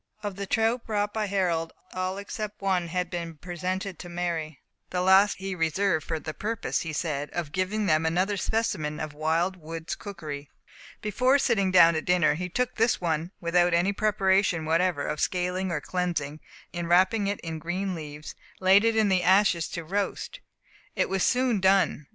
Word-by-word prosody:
Of 205 -2 -3
the 200 0 -5
trout 225 +3 +1
brought 205 -1 -1
by 215 -1 -1
Harold, 175 -5 0 0.2
all 185 +1 -2
except 210 +1 -6
one 185 -3 0
had 180 +1 -2
been 175 - -2
cleaned, 170 -1 -5
and 150 - -27
presented 185 +1 -4
to 175 - -8
Mary; 170 -4 -3 0.3
the 180 0 -1
last 190 +2 +5
he 195 0 -4
reserved 165 0 0
for 160 - -1
the 155 0 -6
purpose, 220 +4 -2
he 165 - -4
said, 150 -2 -2
of 170 -4 -3
giving 190 +5 -1
them 155 -4 +3
another 180 +5 +1
specimen 180 -7 -1
of 155 -1 -5
wild 165 +5 0
woods' 165 0 -6
cookery. 150 -8 -7 0.5
Before 255 +6 +3
sitting 225 -8 +2
down 170 -2 +7
to 160 - -1
dinner, 180 -4 +3
he 180 +4 -4
took 250 +6 -2
this 225 +1 +2
one 165 -1 -1
without 175 0 +2
any 180 +4 +2
preparation 195 -5 +2
whatever 165 -1 +1
of 150 - -3
scaling 180 +1 -1
or 165 - -1
cleansing, 155 -4 -2 0.3
and 175 -1 -4
wrapping 190 +4 +4
it 200 0 -2
in 160 -1 -5
green 185 +4 -2
leaves, 150 -2 -7 0.3
laid 190 +2 +5
it 225 0 +2
in 220 -1 +3
the 190 -2 +2
ashes 185 -2 +3
to 170 - -5
roast. 200 - -3 0.6
It - - +1
was 195 -1 -1
soon 250 -2 +2
done. 190 -6 +2
180 Hz, 185 wpm, -27 LUFS, 165-200 Hz, 0.6 s, down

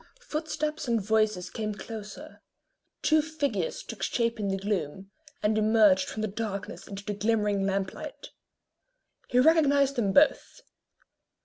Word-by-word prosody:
Footsteps 305 - -3
and 235 -1 +2
voices 215 -3 0
came 215 -2 -3
closer; 210 0 -9 0.6
two 310 0 +4
figures 315 - -2
took - - -9
shape 230 -1 0
in 205 - -1
the 195 0 0
gloom, 195 -1 -3 0.3
and 210 +1 +2
emerged 210 -4 +4
from 215 - -4
the - - +1
darkness 205 -1 -5
into 200 0 -8
the 210 - -2
glimmering 205 -1 +1
lamp 195 -1 -1
light. - - -9 1.0
He 245 - 0
recognised 280 -1 +4
them 205 -5 +1
both. 290 +8 +3
215 Hz, 135 wpm, -28 LUFS, 200-275 Hz, 1.0 s, two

